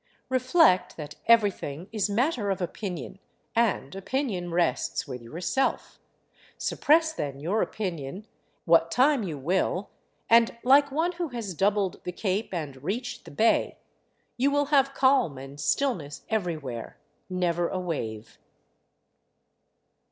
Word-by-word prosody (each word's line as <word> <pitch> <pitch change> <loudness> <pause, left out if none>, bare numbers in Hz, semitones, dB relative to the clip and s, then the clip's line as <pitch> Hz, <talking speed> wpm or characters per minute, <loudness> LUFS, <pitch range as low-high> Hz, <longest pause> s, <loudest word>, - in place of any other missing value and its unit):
Reflect 255 - +3
that 150 -2 -7
everything 195 -8 +2
is 210 -2 0
matter 235 0 0
of 195 - -1
opinion; 185 0 -5 0.4
and 225 -12 +1
opinion 195 -4 -2
rests 170 -7 0
with 125 -3 -6
yourself, 175 - -2 0.6
suppress 315 +1 +2
then 140 - -4
your 185 +9 0
opinion, 180 -1 -4 0.4
what 165 -1 +5
time 265 - +3
you 170 -8 -4
will, 180 +6 -1 0.4
and 230 0 +4
like 280 +3 +6
one 325 +5 +1
who 350 -1 -3
has 230 -8 -5
doubled 195 +2 0
the 180 - -4
cape 195 +4 -2
and 145 -7 -5
reached 230 - -4
the - - -10
bay, 220 +11 +2 0.6
you 265 +3 +3
will 290 0 +2
have 275 -1 +4
calm 260 - +3
and 135 +2 -10
stillness 170 - -1
everywhere, 155 - -3 0.3
never 175 -2 0
a 185 - -2
wave. 115 -12 -5
190 Hz, 125 wpm, -27 LUFS, 165-245 Hz, 0.6 s, like